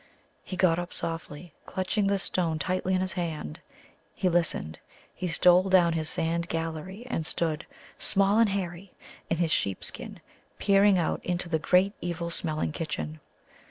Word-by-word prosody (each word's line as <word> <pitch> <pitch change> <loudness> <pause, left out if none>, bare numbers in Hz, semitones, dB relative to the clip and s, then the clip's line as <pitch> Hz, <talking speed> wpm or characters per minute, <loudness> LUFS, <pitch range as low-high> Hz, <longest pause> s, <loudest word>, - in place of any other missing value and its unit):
He 185 - -6
got 175 -2 +4
up 175 0 -5
softly, 165 0 -5
clutching 195 +2 0
the 200 0 +2
stone 175 -4 0
tightly 185 +4 0
in 185 - +1
his 185 0 -1
hand. 160 - -4 0.6
He 185 - +1
listened. 165 - 0 0.3
He 180 - -4
stole 180 +2 +5
down 175 -3 +5
his 160 -1 -1
sandy 170 +1 0
gallery, 165 +6 -4
and 205 -10 -2
stood, 160 0 -1 0.3
small 200 +2 +3
and 230 -2 +5
hairy, 185 -1 -4 0.4
in 165 - +1
his 170 -2 +1
sheep 100 -9 0
skin, - - -3 0.4
peering 200 -1 +5
out 170 - 0
into 180 0 -2
the 160 -2 +1
great 185 +5 +3
evil 170 -1 -3
smelling 155 -2 -2
kitchen. 155 0 -4
175 Hz, 160 wpm, -28 LUFS, 165-185 Hz, 0.6 s, stole